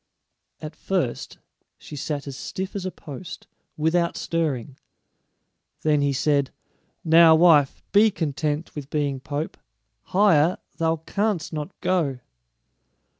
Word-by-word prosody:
At 155 Hz, 0 st, -7 dB
first 170 Hz, -9 st, -2 dB, 0.4 s
she 150 Hz, -, -10 dB
sat 145 Hz, 0 st, -4 dB
as 140 Hz, -2 st, -7 dB
stiff 190 Hz, +8 st, -5 dB
as 190 Hz, -2 st, -3 dB
a -, -, -4 dB
post, 150 Hz, +2 st, -9 dB, 0.3 s
without 170 Hz, +2 st, +1 dB
stirring. 145 Hz, -6 st, -2 dB, 1.0 s
Then 150 Hz, -2 st, +3 dB
he 140 Hz, 0 st, +2 dB
said, 140 Hz, 0 st, +1 dB, 0.5 s
"Now, 165 Hz, 0 st, +7 dB
wife, 160 Hz, -5 st, +4 dB
be 210 Hz, +2 st, +6 dB
content 155 Hz, -3 st, -3 dB
with 145 Hz, -2 st, -7 dB
being 145 Hz, -3 st, -1 dB
pope; 145 Hz, +3 st, -4 dB, 0.5 s
higher 180 Hz, -4 st, +3 dB, 0.2 s
thou 165 Hz, -1 st, +1 dB
canst 205 Hz, -7 st, -1 dB
not 155 Hz, +4 st, -6 dB
go." 160 Hz, -8 st, 0 dB
155 Hz, 120 wpm, -24 LUFS, 145-175 Hz, 1.0 s, Now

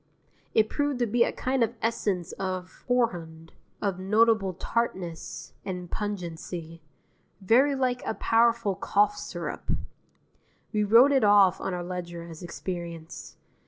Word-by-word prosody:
It 220 Hz, -1 st, +5 dB
proved 290 Hz, +2 st, -1 dB
to 245 Hz, -, +1 dB
be 235 Hz, +2 st, +3 dB
a -, -, 0 dB
kind 260 Hz, -1 st, 0 dB
of 230 Hz, +1 st, -1 dB
essence 205 Hz, -6 st, -1 dB
of 185 Hz, -1 st, -5 dB
horehound, 170 Hz, -10 st, -1 dB, 0.3 s
of 195 Hz, -3 st, -1 dB
notable 210 Hz, -1 st, +3 dB
tartness 185 Hz, -6 st, -3 dB
and 180 Hz, -2 st, -5 dB
pungency, 170 Hz, -4 st, -5 dB, 0.6 s
very 250 Hz, +9 st, +4 dB
like 255 Hz, -2 st, 0 dB
a -, -, -2 dB
powerful 230 Hz, -2 st, +3 dB
cough 205 Hz, +2 st, +2 dB
syrup. -, -, -6 dB, 1.0 s
We 210 Hz, -1 st, +2 dB
wrote 230 Hz, +7 st, +7 dB
it 270 Hz, -3 st, +3 dB
off 205 Hz, -3 st, +5 dB
on 185 Hz, -, -2 dB
our 175 Hz, -, -4 dB
ledger 175 Hz, -1 st, -5 dB
as 165 Hz, -2 st, -10 dB
experience. 170 Hz, -2 st, -7 dB
200 Hz, 130 wpm, -27 LUFS, 175-230 Hz, 1.0 s, wrote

